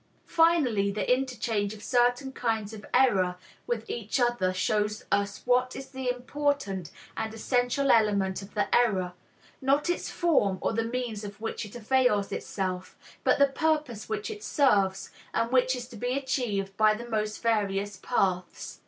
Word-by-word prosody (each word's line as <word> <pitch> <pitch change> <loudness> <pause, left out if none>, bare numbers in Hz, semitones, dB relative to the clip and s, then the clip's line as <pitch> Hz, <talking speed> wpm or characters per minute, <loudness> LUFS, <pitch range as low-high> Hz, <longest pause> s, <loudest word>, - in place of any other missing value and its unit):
Finally, 290 -12 +3
the 215 +5 +2
interchange 225 -5 -2
of 210 - -13
certain 245 +3 +2
kinds 225 -4 -2
of 215 -1 -9
error 195 -9 +3 0.3
with 225 -2 -2
each 230 +2 -2
other 240 -7 +2
shows 210 +4 -1
us 200 0 0
what 250 +1 +2
is 270 - -7
the 260 -2 -3
important 250 - -1 0.3
and 220 - -3
essential 245 +4 +1
element 200 -4 +2
of 195 +2 -12
the 205 -1 +1
error, 190 -7 +2 0.5
not 280 +5 +2
its 350 - -3
form 285 - +2
or - - -1
the 225 +1 0
means 230 -2 -3
of 205 0 -8
which 225 -1 -4
it 210 - -14
avails 240 -3 +2
itself, 185 -2 -4 0.3
but - - +4
the 280 - +6
purpose 290 -5 -1
which 435 0 -3
it 420 -1 -8
serves 200 -9 +2 0.2
and 230 +1 +1
which 255 0 +3
is 245 -1 -6
to 245 - -12
be 245 +4 -1
achieved 225 -8 -2
by 215 0 +5
the 235 +2 -8
most 215 -1 -2
various 205 -3 0
paths. 185 -5 -1
230 Hz, 160 wpm, -28 LUFS, 205-255 Hz, 0.5 s, the